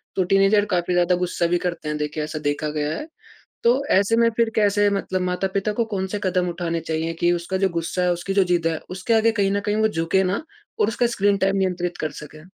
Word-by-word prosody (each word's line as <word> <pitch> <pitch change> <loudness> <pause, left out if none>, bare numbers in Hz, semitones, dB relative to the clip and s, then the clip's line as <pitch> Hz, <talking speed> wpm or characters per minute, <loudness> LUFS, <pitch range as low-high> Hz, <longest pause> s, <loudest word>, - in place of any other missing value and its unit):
तो 190 - +2
टीनेजर 195 +3 +3
काफ़ी 175 0 0
ज़्यादा 175 0 +3
गुस्सा 175 -1 -1
भी 175 +1 +2
करते 170 -3 -5
हैं 150 - -2
देखिए, 150 +1 -3
ऐसा 155 +1 -5
देखा 150 +1 -1
गया 150 0 -2
है। 300 - -6 0.6
तो 245 +4 +3
ऐसे 200 +4 +3
में 230 0 +4
फिर 230 -1 +3
कैसे 205 -1 +3
मतलब 195 -2 -2
माता-पिता 190 +3 -1
को 230 +2 0
कौन 195 -4 -3
से 205 +2 -4
कदम 180 -1 +1
उठाने 170 -1 -2
चाहिए 160 0 -3
कि 175 0 +3
उसका 175 +2 -2
जो 190 0 +2
गुस्सा 170 +1 -2
है 180 - +2
उसकी 175 +3 -4
जो 195 0 +4
ज़िद 175 -2 +1
है 160 -1 -1
उसके 185 +5 -1
आगे 225 0 +4
कहीं 200 -3 +1
न 200 - +1
कहीं 210 - 0
वो 220 0 +3
झुके 180 -1 +1
ना 190 +8 -1 0.4
और - - +3
उसका 235 +2 +1
स्क्रीन 205 -3 +1
टाइम 195 0 +1
नियंत्रित 180 -2 -1
कर 155 - -3
सके? 155 +1 -12
185 Hz, 240 wpm, -22 LUFS, 170-200 Hz, 0.6 s, में